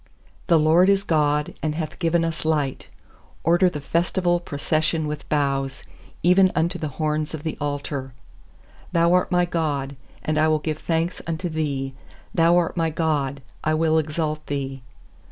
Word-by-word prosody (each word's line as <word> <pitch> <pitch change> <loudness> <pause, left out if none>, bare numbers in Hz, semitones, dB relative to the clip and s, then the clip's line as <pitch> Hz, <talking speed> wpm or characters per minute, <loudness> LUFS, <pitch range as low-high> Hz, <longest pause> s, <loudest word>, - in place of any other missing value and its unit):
27The 165 -3 +4
LORD 170 +5 +5
is 200 0 +3
God, 150 -4 +1
and 155 -1 -1
hath 160 0 -4
given 165 -1 +2
us 165 -1 -3
light; 150 -4 -1 0.6
Order 175 +3 +4
the 150 - -5
festival 175 +4 +1
procession 155 0 -1
with 150 0 -5
boughs, 135 -2 0 0.4
even 185 +2 +5
unto 170 +2 0
the 155 - -2
horns 155 0 -1
of 150 - -8
the 160 - -3
altar. 145 -2 -3 0.8
28Thou 170 0 +4
art 180 +1 +2
my 180 0 +3
God, 145 -5 -2 0.3
and 155 0 0
I 155 - +4
will 155 0 +3
give 155 0 -3
thanks 165 +1 -1
unto 170 +2 -2
Thee; 140 -4 -2 0.4
Thou 170 +1 +4
art 175 -2 +1
my 165 -2 +1
God, 145 -4 -1 0.2
I 155 0 +2
will 160 0 +3
exalt 155 0 -2
Thee. 135 -2 -3
155 Hz, 160 wpm, -23 LUFS, 150-170 Hz, 0.8 s, LORD